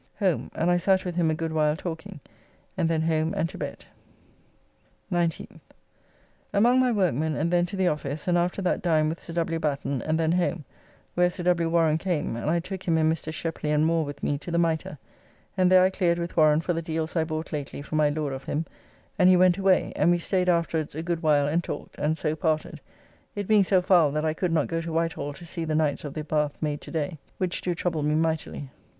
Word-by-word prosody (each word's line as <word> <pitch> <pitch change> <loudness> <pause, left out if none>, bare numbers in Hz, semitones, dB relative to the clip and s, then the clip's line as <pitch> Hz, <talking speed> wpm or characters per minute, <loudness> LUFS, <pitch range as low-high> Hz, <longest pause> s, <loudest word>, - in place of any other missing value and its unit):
Home, 190 -6 0
and 170 +2 +1
I 175 - +4
sat 190 +1 +2
with 180 - -3
him 170 -2 +2
a 155 - +1
good 160 0 -3
while 155 -1 +2
talking, 160 -4 -7 0.5
and 165 - 0
then 160 -1 +1
home 160 0 0
and 165 - +1
to - - -9
bed. - - -6 1.3
19th. 170 -2 -2 0.9
Among 240 +5 +4
my 255 -1 +3
workmen 160 - +1
and 165 +4 -1
then 175 0 +3
to 200 - -5
the 190 -1 +1
office, 150 -1 -3
and 175 - +3
after 175 +3 0
that 180 - 0
dined 155 -3 +2
with 165 - -4
Sir 165 - -8
W. 165 -1 -1
Batten, 140 -4 -2
and 155 +4 -1
then 160 0 +2
home, 175 -3 0 0.5
where 180 0 +3
Sir 180 - -6
W. 170 -2 +2
Warren 165 -2 +2
came, 165 -9 -2
and 115 +6 -3
I 170 +2 +2
took 185 +2 -6
him 165 -3 +1
and 160 0 +3
Mr. 160 -1 -5
Shepley 160 -1 -3
and 150 +1 +3
Moore 165 0 +2
with 145 -1 -8
me 145 - 0
to 165 - -8
the 170 - 0
Mitre, 165 -2 0 0.6
and 185 -1 +3
there 185 0 +7
I 185 - +3
cleared 175 -3 +1
with 170 0 -4
Warren 155 -1 +4
for 175 - -1
the 165 - -2
deals 160 0 -3
I 165 - +2
bought 160 0 -5
lately 145 -1 -5
for 155 - -6
my 150 -1 +3
Lord 145 -2 -2
of 135 0 -7
him, 155 +3 -2 0.5
and 180 -1 +6
he 185 - +6
went 185 +1 +4
away, 190 -1 +2
and 155 - +3
we 175 - +4
staid 180 +1 0
afterwards 165 -3 0
a 160 - -4
good 170 -1 -2
while 145 -3 +3
and 165 +4 0
talked, - - -7
and 155 +2 0
so 155 -1 -1
parted, 155 -2 -1 0.5
it 205 -2 -3
being 215 -2 +5
so 185 -1 +2
foul 175 -5 +5
that 155 +1 -1
I 155 - +1
could 180 +1 -1
not 165 - +2
go 165 0 -2
to 165 0 -5
Whitehall 160 -3 -2
to 170 - -11
see 170 0 -4
the 155 -1 -1
Knights 155 -2 0
of 145 -2 -7
the 155 - -3
Bath 150 -1 -1
made 150 -2 -2
to - - -10
day, 160 0 -3 0.2
which 185 -1 -2
do 175 -1 -1
trouble 165 -2 -1
me 150 +1 +1
mightily. 160 -3 -2
165 Hz, 235 wpm, -26 LUFS, 155-175 Hz, 1.3 s, there